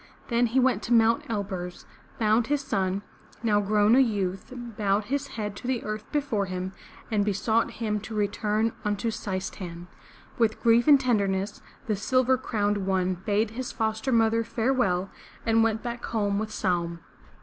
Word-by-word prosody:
Then 240 0 +3
he 245 +4 +2
went 250 -5 +3
to 230 - -1
Mt. 230 0 +3
Elburz, 190 -5 -4 0.3
found 220 +1 +2
his 290 -1 +1
son, 195 -7 -1 0.4
now 210 -2 +3
grown 210 +1 +3
a - - +6
youth, 200 -7 0
bowed 215 -5 -1
his 280 +5 -2
head 210 -2 -3
to 245 - -7
the 255 -2 -1
earth 215 0 -5
before 275 -10 0
him, 185 0 -4 0.4
and 210 -2 +2
besought 215 +3 +1
him 215 -2 -2
to 215 +2 -7
return 210 +2 0
unto 210 +2 -1
Seis 190 -3 -3
tan'. 175 -2 -8 0.5
With 225 -2 +2
grief 235 +2 +4
and 285 -2 +8
tenderness, 200 -6 0 0.2
the 215 - 0
Silver 255 +5 +2
Crowned 205 -5 -1
One 185 -1 +1
bade 205 +4 0
his 250 +2 -5
foster 220 +2 -1
mother 230 -1 +3
farewell 225 -6 0 0.3
and 225 0 +4
went 225 -1 0
back 240 0 -5
home 205 -3 0
with 215 0 -3
Saum. 170 -5 -1
215 Hz, 165 wpm, -27 LUFS, 200-235 Hz, 0.5 s, and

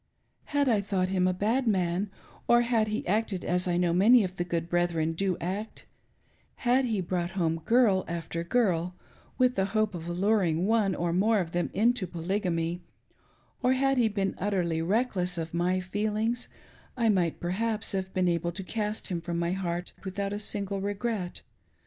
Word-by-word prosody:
Had 285 -1 +1
I 220 -5 +3
thought 190 -2 -1
him 185 -1 +2
a - - +3
bad 225 +7 0
man, 185 -1 +1 0.4
or 240 0 +6
had 235 -2 +2
he 215 0 -2
acted 205 -1 0
as 180 +1 +1
I 175 -1 +1
know 175 -1 +2
many 215 +6 +6
of 185 0 -5
the 175 - 0
good 170 -1 -2
brethren 170 -2 +1
do 185 +1 -1
act; 195 +6 -5 0.8
had 255 +2 +4
he 220 -5 0
brought 175 -1 -2
home 165 -2 0
girl 225 -6 +4
after 170 0 -4
girl 180 -4 +1 0.4
with 255 -1 +4
the 190 -5 +1
hope 215 -2 +2
of 170 -1 -6
alluring 180 -2 +1
one 210 -3 +2
or 170 0 -1
more 215 +5 +3
of 170 -3 -3
them 175 0 -1
into 230 -2 +2
Polygamy, 175 -1 -2 0.8
or 255 0 +3
had 270 0 +2
he 235 - +4
been 200 -2 -1
utterly 180 -5 0
reckless 185 -2 0
of 165 -1 -4
my 180 +2 +1
feelings, 215 +5 -1 0.5
I 235 -2 +2
might 180 -6 +2
perhaps 215 +5 -1
have 190 -2 -2
been 185 -1 +1
able 170 0 0
to 195 - -5
cast 210 +2 -3
him 175 -3 -2
from 170 0 -3
my 170 0 0
heaft 180 -2 -3
without 200 +1 -3
a 205 - -3
single 200 -1 -3
regret. 205 -2 -3
190 Hz, 180 wpm, -28 LUFS, 175-215 Hz, 0.8 s, or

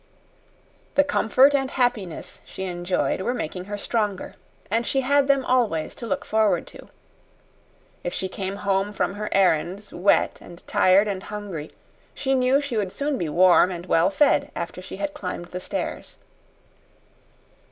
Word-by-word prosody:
The 285 - +6
comfort 275 0 +4
and 270 -2 +1
happiness 240 - -2
she 190 - -8
enjoyed 180 0 -1
were 245 +6 -1
making 180 -2 -4
her 205 +1 -5
stronger, 205 -2 -2 0.4
and 230 +2 +2
she 270 +3 +1
had 280 +1 +3
them 275 -2 +2
always 225 -11 +1
to 235 - -6
look - - -2
forward 220 -1 +2
to. - - -13 1.1
If 175 - -2
she 190 - -3
came 190 +1 -5
home 200 0 0
from 195 - -1
her 210 +1 -4
errands 190 +2 +1
wet 195 +3 +2
and 175 0 -13
tired 190 +3 +4
and 195 -2 -3
hungry, 195 -8 -6 0.5
she 270 -1 0
knew 260 +1 +3
she 280 -5 -3
would 200 -3 -1
soon 285 +3 -2
be 165 - -2
warm 180 +3 +5
and 175 -1 -6
well 170 0 +3
fed 280 +9 +3
after 170 +1 -5
she 185 - -8
had 295 +8 -3
climbed 180 -11 -6
the 180 - -5
stairs. - - -5
200 Hz, 160 wpm, -24 LUFS, 185-255 Hz, 1.1 s, The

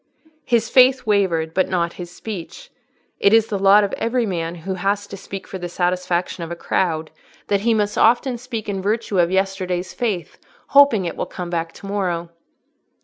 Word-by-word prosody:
His 230 -2 +2
faith 255 +1 +5
wavered, 180 -7 +1
but 185 - +1
not 170 -2 0
his 175 -1 -8
speech: 215 - -8 0.5
it 200 - +4
is 225 -1 +6
the 200 - -2
lot 200 +2 +6
of 200 - -2
every 235 +1 0
man 170 -4 -3
who 180 +3 -5
has 200 +2 -1
to 200 - -9
speak 195 0 -8
for 190 - -7
the 175 0 -5
satisfaction 180 0 -1
of 165 - -6
the 170 - -4
crowd, 160 -2 -1 0.4
that 200 -1 +2
he 230 +1 +2
must 210 -1 0
often 240 +2 +3
speak 235 -3 -6
in 195 -2 -2
virtue 210 -1 -1
of 170 -1 +4
yesterday's 185 -1 -1
faith, 210 -8 -3 0.3
hoping 280 -9 +5
it 170 - -3
will - - -3
come 175 -1 -6
back 165 -1 -2
to - - -12
morrow. 180 -4 -2
195 Hz, 190 wpm, -21 LUFS, 175-220 Hz, 0.5 s, is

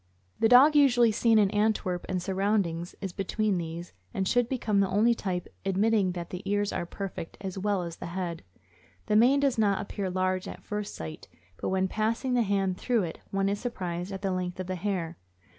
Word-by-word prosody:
The 225 - +4
dog 270 +5 +8
usually 245 -5 +5
seen 225 +1 +3
in 200 -2 +4
Antwerp 205 -4 0
and 185 -1 0
surroundings 190 -2 -1
is 195 -3 -4
between 195 0 0
these, 170 +1 -6 0.2
and 190 -1 0
should 245 +2 +2
become 225 -6 0
the 195 -1 +2
only 215 +5 +4
type, 185 -6 -3 0.2
admitting 195 0 +2
that 175 -1 -6
the 180 - -5
ears 205 0 0
are 175 - -3
perfect 190 -3 -6
as 190 -1 -5
well 200 -2 0
as 170 -1 -6
the - - -6
head. 170 -1 -4 0.6
The 210 - +1
mane 250 +6 +5
does 270 -4 +1
not 200 -3 +3
appear 200 -1 -3
large 185 0 -1
at - - -9
first 210 0 -4
sight, 80 -1 -7 0.3
but - - -3
when 190 0 +1
passing 225 +6 -1
the 245 - +3
hand 195 -3 0
through 240 -5 +1
it 165 -2 -5
one 195 0 0
is 200 +1 -1
surprised 180 -6 -4
at 195 0 -6
the 195 - 0
length 180 0 -3
of 185 - -3
the 185 - -3
hair. 180 -3 -3
195 Hz, 205 wpm, -28 LUFS, 180-215 Hz, 0.6 s, dog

